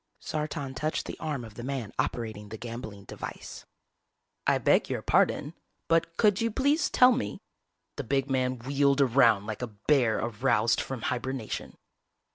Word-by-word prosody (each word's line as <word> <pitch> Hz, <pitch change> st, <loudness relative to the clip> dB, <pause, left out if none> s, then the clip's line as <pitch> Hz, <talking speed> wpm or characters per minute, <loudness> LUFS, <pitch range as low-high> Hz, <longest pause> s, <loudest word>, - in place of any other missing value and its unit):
Sartan 150 Hz, -3 st, -4 dB
touched 155 Hz, +4 st, -2 dB
the -, -, -6 dB
arm 145 Hz, -6 st, -3 dB
of 110 Hz, -, -11 dB
the 120 Hz, -, -8 dB
man 130 Hz, -5 st, -4 dB
operating 110 Hz, -3 st, -2 dB
the 110 Hz, -, -7 dB
gambling 115 Hz, -3 st, -7 dB
device. -, -, -8 dB, 0.8 s
"I -, -, +4 dB
beg -, -, +3 dB
your -, -, -2 dB
pardon, -, -, +2 dB, 0.3 s
but 165 Hz, 0 st, +1 dB
could 210 Hz, -2 st, +3 dB
you 230 Hz, -, +2 dB
please 285 Hz, +7 st, +2 dB
tell 250 Hz, 0 st, +6 dB
me 255 Hz, +1 st, -2 dB, 0.3 s
" -, -, -52 dB
The 145 Hz, -, -3 dB
big 135 Hz, +2 st, 0 dB
man 130 Hz, -1 st, 0 dB
wheeled 140 Hz, +3 st, +1 dB
around 115 Hz, -6 st, +4 dB
like 110 Hz, +1 st, -5 dB
a 125 Hz, -, -2 dB
bear 115 Hz, +2 st, +2 dB
aroused 115 Hz, 0 st, +1 dB
from 130 Hz, -4 st, -6 dB
hibernation. 125 Hz, -2 st, -3 dB
130 Hz, 160 wpm, -28 LUFS, 115-150 Hz, 0.8 s, tell